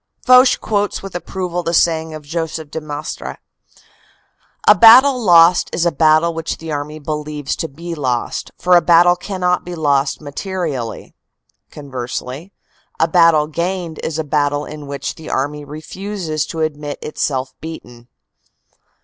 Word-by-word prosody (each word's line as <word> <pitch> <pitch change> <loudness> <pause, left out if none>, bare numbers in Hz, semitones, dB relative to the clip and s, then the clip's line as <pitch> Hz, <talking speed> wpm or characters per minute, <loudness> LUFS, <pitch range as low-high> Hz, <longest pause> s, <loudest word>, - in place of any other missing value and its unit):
Foch 255 0 +6
quotes 205 -2 -1
with 195 - -8
approval 175 0 -4
the 170 0 -1
saying 160 -1 +2
of 155 - -9
Joseph 160 0 -5
de 160 - -4
Maistre: 150 0 -6 1.3
"A - - +10
battle 250 +3 +7
lost 175 -2 +5
is 175 - 0
a 170 - +3
battle 155 +2 +3
which 165 -1 -4
the 160 -1 -7
army 150 +1 -4
believes 150 -1 -4
to 165 - -3
be 170 +4 -8
lost, 130 -6 -2
for 180 0 +3
a 175 - +6
battle 175 +1 +5
cannot 180 -1 -1
be 180 0 -7
lost 140 -3 +1
materially." 150 - -5 0.6
Conversely: 135 +4 -6 0.5
"A 160 - +3
battle 165 -3 +4
gained 170 +1 -3
is 160 -1 -3
a 160 - -1
battle 145 0 0
in 150 -1 -9
which 140 0 -4
the 160 -1 -11
army 145 +2 -2
refuses 155 +2 -5
to 165 - -5
admit 150 -2 -3
itself 130 -3 -3
beaten." 120 -7 -10
160 Hz, 145 wpm, -18 LUFS, 145-175 Hz, 1.3 s, A